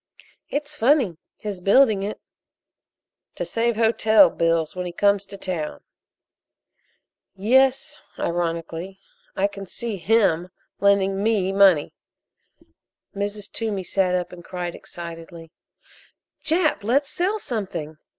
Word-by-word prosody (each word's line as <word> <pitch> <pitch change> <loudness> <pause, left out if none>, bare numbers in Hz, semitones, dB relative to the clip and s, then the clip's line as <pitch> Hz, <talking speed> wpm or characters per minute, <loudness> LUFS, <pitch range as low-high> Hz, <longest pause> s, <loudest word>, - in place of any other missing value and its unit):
"It's 295 +1 -3
funny 245 - +2 0.2
his 205 -3 -5
building 205 +2 +4
it." 205 +2 -4 1.2
"To - - -3
save 230 0 0
hotel 220 +3 +5
bills 165 -1 0
when 180 0 -3
he - - -5
comes 200 +1 +2
to 200 - -8
town. 175 -6 -4 1.5
Yes," 265 +6 +2 0.2
ironically, 170 +2 -3 0.4
"I 195 - +1
can 200 -1 -5
see 225 +2 -4
him 185 -4 +2 0.3
lending 195 -1 +3
me 205 -3 +1
money." 195 -6 +4 1.2
Mrs. 205 +1 -4
Toomey 210 -4 -3
sat 185 0 +1
up 180 -1 -2
and 175 -1 -11
cried 175 -1 -5
excitedly: 165 -1 -9 0.9
"Jap, 320 - +2
let's 270 +7 +1
sell 380 +7 0
something! 190 - -5
195 Hz, 110 wpm, -23 LUFS, 175-225 Hz, 1.5 s, hotel